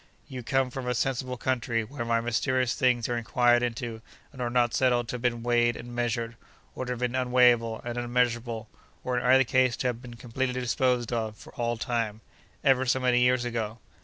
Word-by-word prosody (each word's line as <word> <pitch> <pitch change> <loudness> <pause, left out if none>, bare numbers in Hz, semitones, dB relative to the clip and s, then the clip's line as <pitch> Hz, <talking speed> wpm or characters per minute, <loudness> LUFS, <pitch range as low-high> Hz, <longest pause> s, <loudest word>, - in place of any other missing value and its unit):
You 130 -1 -6
come 135 +1 0
from 130 -1 -5
a 125 - 0
sensible 130 0 -1
country, 120 -2 -1
where 130 +3 -6 0.2
mysterious 125 +1 +1
things 125 -3 +2
are 120 - -1
inquired 120 +1 +3
into 115 -1 -3 0.3
and 130 - -8
are 120 - 0
not 120 -1 +2
settled 120 -2 +2
to - - -3
have - - -11
been 120 -2 -1
weighed 120 0 +2
and 120 0 -9
measured—or 120 +1 -4
to 125 - -4
have 120 - -7
been 125 -1 -1
unweighable 125 -3 +3
and 120 0 -3
unmeasurable—or 120 0 -2
in - - -5
either 130 +1 +6
case 130 -1 +2
to - - -4
have 120 -1 -5
been 120 -2 -10
completely 125 +2 -3
disposed 125 -1 0
of, 110 -2 -2
for - - -14
all 120 0 -1
time—ever 120 +3 -1
so 130 +2 +2
many 125 -1 +3
years 125 0 +3
ago. 115 -2 -3
120 Hz, 190 wpm, -27 LUFS, 120-125 Hz, 0.3 s, either